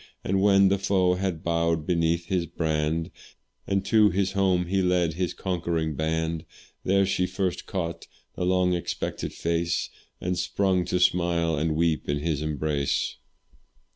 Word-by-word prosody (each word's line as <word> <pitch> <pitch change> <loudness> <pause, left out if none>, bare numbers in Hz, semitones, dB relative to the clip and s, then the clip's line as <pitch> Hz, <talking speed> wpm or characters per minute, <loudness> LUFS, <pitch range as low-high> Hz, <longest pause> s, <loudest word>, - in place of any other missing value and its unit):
And 95 +1 +1
when 100 -1 +5
the 100 0 +1
foe 95 -2 +2
had 90 -3 -2
bowed 85 -2 0
beneath 85 0 +1
his 90 -2 -1
brand, 80 +2 -1 0.6
And 100 0 0
to 105 0 +5
his 95 +1 0
home 95 -2 +2
he 95 +2 0
led 90 -3 +2
his 90 +1 -2
conquering 85 -4 -2
band, 80 +1 -1 0.4
There 100 +1 +3
she 90 -1 0
first 95 0 -2
caught 85 -4 -4 0.3
his - - -3
long 90 0 +2
expected 85 -2 -3
face, 85 +1 -1 0.3
And 90 0 -2
sprung 95 -3 +1
to 90 +1 0
smile 85 -2 +2
and 80 +1 0
weep 80 -2 0
in 70 - +1
his 75 -1 -1
embrace. 75 -2 -1
85 Hz, 150 wpm, -26 LUFS, 80-95 Hz, 0.6 s, when